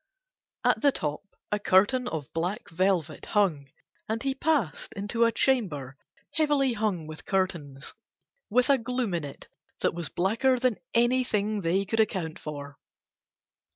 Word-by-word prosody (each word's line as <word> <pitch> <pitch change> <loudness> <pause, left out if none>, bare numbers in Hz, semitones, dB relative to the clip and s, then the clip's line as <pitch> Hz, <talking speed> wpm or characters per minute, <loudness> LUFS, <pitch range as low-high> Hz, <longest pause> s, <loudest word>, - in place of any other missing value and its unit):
At - - +3
the 285 - +5
top 150 - -3 0.3
a 210 - +1
curtain 205 +6 +3
of 155 - -5
black 175 +5 -3
velvet 170 -3 0
hung 155 -9 +2 0.4
and 225 +1 -1
he 270 -1 +1
passed 275 - 0
into 205 +4 +1
a 230 - +3
chamber 180 - 0 0.4
heavily 290 -4 +2
hung 205 -7 -1
with 155 0 -9
curtains, 170 -8 -2 0.6
with 250 +5 +3
a 275 - +4
gloom 245 -3 -2
in 170 -2 -1
it 140 -1 -8 0.3
that - - +2
was 170 -1 -4
blacker 230 +8 +2
than 250 -3 +1 0.2
anything 230 -4 +2
they 185 +3 +1
could 225 +3 -1
account 180 -7 0
for. 145 -2 -7
200 Hz, 145 wpm, -28 LUFS, 165-245 Hz, 0.6 s, the